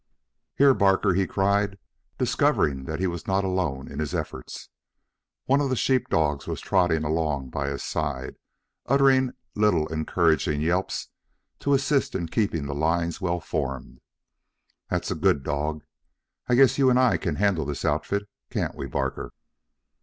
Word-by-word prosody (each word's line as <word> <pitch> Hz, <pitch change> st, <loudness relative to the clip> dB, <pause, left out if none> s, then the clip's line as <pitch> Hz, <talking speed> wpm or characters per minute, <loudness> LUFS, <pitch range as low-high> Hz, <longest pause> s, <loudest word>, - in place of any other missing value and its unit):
"Here, 140 Hz, -1 st, +6 dB
Barker," 95 Hz, -2 st, +3 dB
he 95 Hz, +1 st, +1 dB
cried, 100 Hz, 0 st, +1 dB, 0.4 s
discovering 65 Hz, -2 st, +1 dB
that 80 Hz, +3 st, -4 dB
he 95 Hz, -, 0 dB
was 85 Hz, -2 st, -4 dB
not 95 Hz, 0 st, +1 dB
alone 90 Hz, -8 st, -1 dB
in 70 Hz, -, -7 dB
his 75 Hz, -2 st, -2 dB
efforts. -, -, -6 dB, 0.8 s
One 140 Hz, +2 st, +3 dB
of 140 Hz, -, 0 dB
the 130 Hz, -, +1 dB
sheep 130 Hz, +1 st, +1 dB
dogs 75 Hz, -3 st, 0 dB
was -, -, -3 dB
trotting 90 Hz, -5 st, +1 dB
along 75 Hz, -4 st, -1 dB
by 70 Hz, -1 st, -2 dB
his 70 Hz, -, -4 dB
side, 70 Hz, -4 st, -3 dB, 0.5 s
uttering 135 Hz, -2 st, +4 dB, 0.2 s
little 105 Hz, -7 st, +2 dB
encouraging 80 Hz, -2 st, +1 dB
yelps 90 Hz, +5 st, -1 dB, 0.5 s
to 140 Hz, 0 st, +2 dB
assist 140 Hz, 0 st, +1 dB
in 85 Hz, -2 st, -2 dB
keeping 85 Hz, -7 st, 0 dB
the 70 Hz, -, -4 dB
lines 85 Hz, +4 st, 0 dB
well 90 Hz, -2 st, 0 dB
formed. 65 Hz, -5 st, -4 dB, 0.9 s
"That's -, -, -2 dB
a -, -, +2 dB
good 70 Hz, -, +2 dB
dog. 75 Hz, +2 st, -2 dB, 0.7 s
I 125 Hz, -, +4 dB
guess 135 Hz, +2 st, +5 dB
you 135 Hz, -1 st, +5 dB
and 125 Hz, -, +4 dB
I 130 Hz, -1 st, +4 dB
can 85 Hz, -4 st, -2 dB
handle 95 Hz, -5 st, +1 dB
this 70 Hz, 0 st, -4 dB
outfit, 100 Hz, 0 st, -1 dB, 0.2 s
can't -, -, -2 dB
we, 70 Hz, -, -6 dB
Barker?" 65 Hz, +1 st, -3 dB
85 Hz, 155 wpm, -25 LUFS, 75-105 Hz, 0.9 s, Here